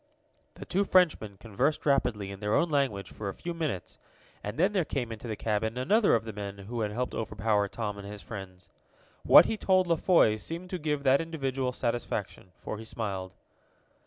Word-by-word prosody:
The - - -9
two 195 +2 +1
Frenchmen 160 - +2
conversed 120 +9 -1
rapidly 120 -8 +1
in 100 - -8
their 105 +1 0
own 170 - +2
language 135 -10 0
for 105 -2 -5
a 95 - -6
few 175 - -5
minutes, 155 - -4 0.4
and 105 - -5
then 190 +5 +3
there 190 -4 +2
came 125 -6 -3
into 115 +2 -7
the 110 - -3
cabin 110 +2 -1
another 200 - +4
of 115 -1 -1
the 110 - -6
men 100 -1 -6
who 110 +4 -5
had 105 - 0
helped 125 +4 -3
overpower 105 -1 0
Tom 105 -1 -4
and 100 - -8
his 105 0 -8
friends. 95 -5 -9 0.5
What - - +8
he 220 - -1
told 185 -2 +3
La 170 -2 +2
Foy 150 - +4
seemed 170 - -6
to 185 - -2
give 150 -2 -1
that 135 +2 +4
individual 135 -6 -2
satisfaction, 115 -6 -3
for 105 - -6
he - - -7
smiled. 100 -5 -4
115 Hz, 195 wpm, -29 LUFS, 105-155 Hz, 0.5 s, What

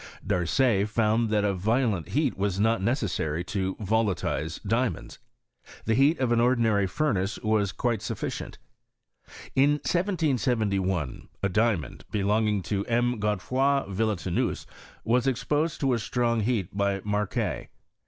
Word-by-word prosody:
Darcet 100 +4 +2
found 110 +1 +1
that 105 -1 +2
a 100 - +1
violent 105 -1 0
heat 145 -2 +1
wvA 100 -1 -1
not 110 -1 +2
necessary 90 - -1
to 95 0 -2
volatilize 100 -6 -1
diamonds. 115 +4 -1 0.7
The 115 - +2
heat 140 +7 +4
of 130 -3 0
an 120 - +3
ordinary 115 -5 +3
furnace 105 -5 -1
was 110 -3 +1
quite 115 -2 -1
sufficient. 110 - -5 1.0
In 140 +2 +4
1771 120 - 0 0.2
a 100 - +2
diamond, 105 -3 0
belonging 105 0 +1
to 100 +2 -1
M. 120 0 +1
Godefroi 130 +7 +1
Villetaneuse, 100 -3 -1 0.4
was 125 +3 +2
exposed 150 +5 0
to 135 -2 +2
a 120 - 0
strong 120 0 0
heat 105 -5 -1
by 100 -1 0
Macquer. 105 0 -2
110 Hz, 125 wpm, -27 LUFS, 100-125 Hz, 1.0 s, heat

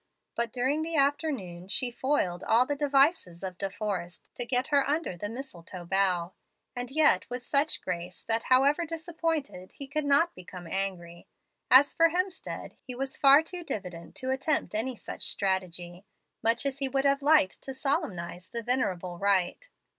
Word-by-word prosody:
But 235 -1 -2
during 260 +6 0
the 325 +1 -3
afternoon 275 - 0
she 245 +5 0
foiled 235 -9 0
all 230 +3 +4
the 290 - -1
devices 275 - +2
of 185 -1 -5
De 195 - -1
Forrest 190 -4 -5
to 245 - -4
get 250 +1 0
her 280 -2 +3
under 300 - -1
the 205 +4 -5
mistletoe 185 -8 -8
bough, 185 -1 +1 0.4
and 245 0 -4
yet 280 -10 +3
with 245 0 -5
such 285 +2 +2
grace 175 +1 -5
that, 225 0 0
however 275 +6 +4
disappointed, 325 - -3
he 280 - -7
could 300 +2 -2
not 285 +5 +3
become 180 -1 -10
angry. 175 -1 -4 0.4
As 270 +3 +7
for 330 0 +5
Hemstead, 365 +2 -3
he 250 - -6
was 270 +1 -3
fat 280 +3 +6
too 355 +1 -4
diffident 180 - -6
to 260 0 -2
attempt 270 0 0
any 235 +4 -1
such - - -4
strategy, 185 -1 -2 0.3
much 230 +4 +2
as 275 0 -2
he 270 -1 0
would 270 +1 0
have 275 0 +3
liked 285 -9 +4
to 270 - -6
solemnize 190 - -2
the 235 -1 -5
venerable 185 -8 -1
rite. 200 - +1
250 Hz, 170 wpm, -29 LUFS, 185-285 Hz, 0.4 s, As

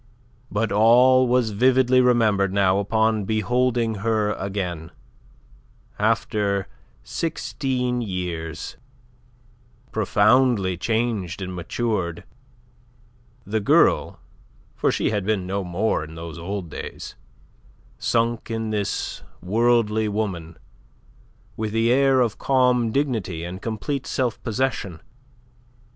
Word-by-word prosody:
But 105 0 -1
all 125 +5 +5
was 120 -2 +2
vividly 130 +3 +4
remembered 110 -6 +3
now 95 -1 +2
upon 110 +1 +1
beholding 115 +2 0
her 110 -1 +1
again, 90 -5 -4 1.1
after 105 -2 0 0.4
sixteen 130 -6 -2
years, 90 -6 -5 1.1
profoundly 110 -1 +3
changed 110 -2 -1
and 95 -1 -5
matured, 90 -2 -2 1.2
the 110 +3 -1
girl 100 - +3 0.6
for - - +1
she - - 0
had 105 -3 -1
been 100 -2 -1
no 100 +2 -2
more 90 0 -1
in 80 +1 -10
those 85 0 -8
old 90 -1 -5
days - - -7 0.9
sunk 115 0 0
in 115 -1 -3
this 105 -2 -2 0.2
worldly 110 +2 +2
woman 95 -6 -3 1.0
with 110 -1 -3
the 115 +1 +2
air 135 0 +4
of 115 -4 -1
calm 125 -3 +2
dignity 110 - -1
and 90 +2 -6
complete 125 +5 -3
self 125 -4 -1
possession. 115 -7 -2
110 Hz, 100 wpm, -23 LUFS, 95-120 Hz, 1.2 s, all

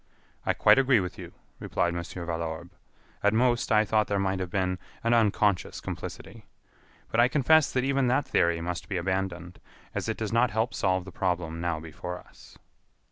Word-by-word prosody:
"I - - +3
quite - - +6
agree 130 -3 +4
with 90 -1 -5
you," - - -8 0.3
replied 85 0 -1
Mon. 85 - -2
Valorbe. 85 -1 -5 0.5
"At 105 +1 +3
most, 120 0 +2
I 110 0 +5
thought 110 0 +2
there 100 - 0
might 95 -1 0
have 90 -1 -3
been 90 -1 -1 0.2
an 115 +1 +2
unconscious 105 -4 +2
complicity. - - -8 0.6
But 115 - +1
I 120 - +6
confess 150 +3 +4
that 125 - 0
even 135 -1 +1
that 130 +3 +1
theory 85 -1 +2
must 85 0 -4
be 100 - -1
abandoned, 90 -1 -3 0.3
as - - -3
it - - -2
does 110 -1 -3
not 120 +1 +4
help 110 +2 -1
solve 95 -1 0
the 95 - -9
problem 85 -2 -2
now 85 -2 -1
before 80 +3 -7
us." - - -17
95 Hz, 185 wpm, -27 LUFS, 85-115 Hz, 0.6 s, quite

